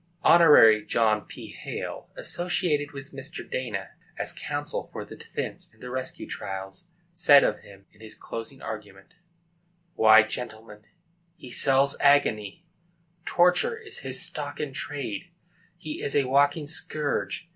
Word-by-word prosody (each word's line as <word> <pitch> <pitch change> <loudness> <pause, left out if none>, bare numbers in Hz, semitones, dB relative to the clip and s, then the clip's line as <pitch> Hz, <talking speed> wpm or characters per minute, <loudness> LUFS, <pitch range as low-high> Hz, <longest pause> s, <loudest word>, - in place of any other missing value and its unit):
] 170 - -39
Hon. 130 -11 +7
John 110 -2 +2
P. - - -10
Hale, - - -7
associated 165 -4 -1
with 135 -1 -10
Mr. 135 +5 -7
Dana, 110 -7 -4 0.3
as - - -2
counsel - - -4
for - - -6
the - - -11
defence, - - -6
in - - -27
the 125 - -8
Rescue 130 0 -4
Trials, 95 - -7 0.3
said 155 -5 +6
of 105 - 0
him, 100 -1 -16
in 105 - -22
his 110 -1 -8
closing 115 +4 -8
argument: 100 -3 -8 0.8
Why, 110 -3 +7
gentlemen, 110 -2 -7 0.5
he 130 -7 -12
sells 135 +2 +2
agony! 140 - +2 0.6
Torture 180 - +3
is 450 -2 -6
his 130 -1 -2
stock 145 -1 -5
in 145 -3 -4
trade! 145 - -5 0.5
He 155 -3 -7
is 140 - -2
a 145 - +4
walking 145 +3 +2
scourge! 155 +2 -2
135 Hz, 140 wpm, -26 LUFS, 110-150 Hz, 0.8 s, Hon